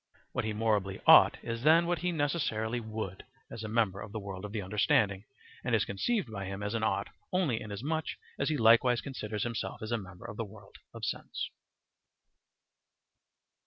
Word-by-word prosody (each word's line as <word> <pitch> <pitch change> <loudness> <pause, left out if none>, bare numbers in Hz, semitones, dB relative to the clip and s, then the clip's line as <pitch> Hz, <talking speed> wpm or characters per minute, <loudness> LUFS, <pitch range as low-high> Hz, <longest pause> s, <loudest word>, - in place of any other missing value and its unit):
What - - -2
he 110 - -1
morally 105 -3 0
"ought" - - +8
is 115 0 -3
then 160 +5 +6
what 175 0 0
he 180 0 0
necessarily 140 -7 0
"would," 110 -4 -5 0.3
as 115 - -6
a - - -3
member 105 -3 +1
of 100 - -8
the 110 - -4
world 100 -1 -6
of 105 - -6
the 105 -2 -3
understanding, 100 0 +2 0.4
and - - +2
is - - +2
conceived 135 - -1
by 95 -2 -4
him 95 +1 -5
as 105 +1 -2
an 115 - 0
"ought" 110 - 0 0.2
only 170 -11 +1
inasmuch 130 +10 -3 0.3
as 140 - +1
he 155 - +1
likewise 120 +1 +5
considers 110 -6 -4
himself 115 -2 -3
as 110 - -5
a 120 - +1
member 95 +1 -11
of 105 -2 -7
the 115 - -1
world 105 0 -13
of - - -5
sense. - - -4
110 Hz, 185 wpm, -31 LUFS, 105-125 Hz, 0.4 s, ought